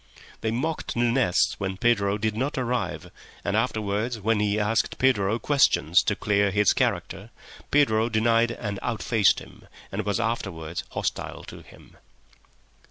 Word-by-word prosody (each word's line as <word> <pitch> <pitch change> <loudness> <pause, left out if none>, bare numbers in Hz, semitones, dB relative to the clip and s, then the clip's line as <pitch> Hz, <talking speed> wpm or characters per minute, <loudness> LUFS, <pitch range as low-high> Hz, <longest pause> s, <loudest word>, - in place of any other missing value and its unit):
They 110 - -2
mocked 150 +8 -3
Nunez 120 -4 +2
when 95 -1 -3
Pedro 100 -3 +2
did 110 0 -1
not 135 +6 -2
arrive, 125 -1 -2 0.3
and 100 0 0
afterwards, 110 0 -1
when 110 +1 +1
he 105 0 +1
asked 110 +2 0
Pedro 115 -5 +2
questions 115 - +3
to 105 - +1
clear 100 -1 +1
his 105 0 +3
character, - - -2 0.4
Pedro 115 -6 +3
denied 115 +1 +2
and 105 -4 -5
outfaced 115 -3 +2
him, - - -12 0.2
and 105 +2 -3
was 100 -1 -1
afterwards 85 -8 -3
hostile - - -4
to - - -11
him. - - -18
110 Hz, 140 wpm, -25 LUFS, 100-120 Hz, 0.4 s, questions